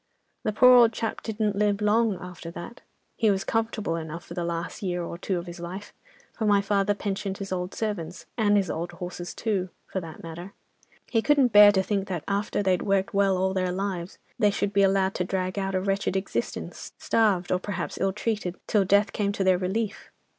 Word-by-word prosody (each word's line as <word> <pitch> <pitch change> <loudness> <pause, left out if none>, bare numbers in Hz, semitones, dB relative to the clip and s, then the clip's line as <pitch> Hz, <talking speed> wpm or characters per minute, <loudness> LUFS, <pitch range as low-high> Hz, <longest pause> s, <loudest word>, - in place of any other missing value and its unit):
"The 215 - -1
poor 250 +4 +7
old 235 -2 +7
chap 225 0 -3
didn't 215 -2 -1
live 205 0 +1
long 210 -1 +2
after 180 -2 -8
that. 175 +8 -9 0.4
He 220 - +3
was 195 -1 +1
comfortable 225 -6 -1
enough 165 +1 -6
for - - -9
the 175 - -3
last 170 +4 -4
year 180 -3 -2
or 170 - -5
two 185 +1 -2
of 170 - -5
his 175 0 -9
life, 185 +4 -7 0.4
for 220 - -2
my 205 -1 +5
father 200 0 +1
pensioned 195 -1 -3
his 195 -1 -6
old 180 0 -3
servants, 185 -6 -4
and 205 -3 +3
his 195 -4 +1
old 175 +2 -4
horses 175 -1 -6
too, 195 -5 -1 0.2
for 190 - -4
that 165 -2 -10
matter. 170 +4 -8 0.6
He 225 - +3
couldn't 275 -2 +3
bear 205 0 +10
to 190 -1 +2
think 200 -1 -1
that 180 -5 -3
after 205 +1 -1
they'd 185 -2 +2
worked 195 -1 0
well 195 -1 +3
all 190 +1 +1
their 185 -1 0
lives, 185 -1 -3 0.2
they 210 - +5
should 200 0 -1
be 200 - +4
allowed 195 0 +3
to 180 - -1
drag 185 +1 -2
out 195 -1 -2
a - - +2
wretched 195 0 -1
existence, 190 0 -4
starved, 205 -6 +1
or 180 - +2
perhaps 190 -2 -4
ill 195 0 +1
treated, 210 -3 -2
till 210 -2 +3
death 200 +2 +3
came 200 -1 0
to 200 - -1
their 185 -1 +3
relief. 205 +3 -2
195 Hz, 210 wpm, -26 LUFS, 180-210 Hz, 0.6 s, bear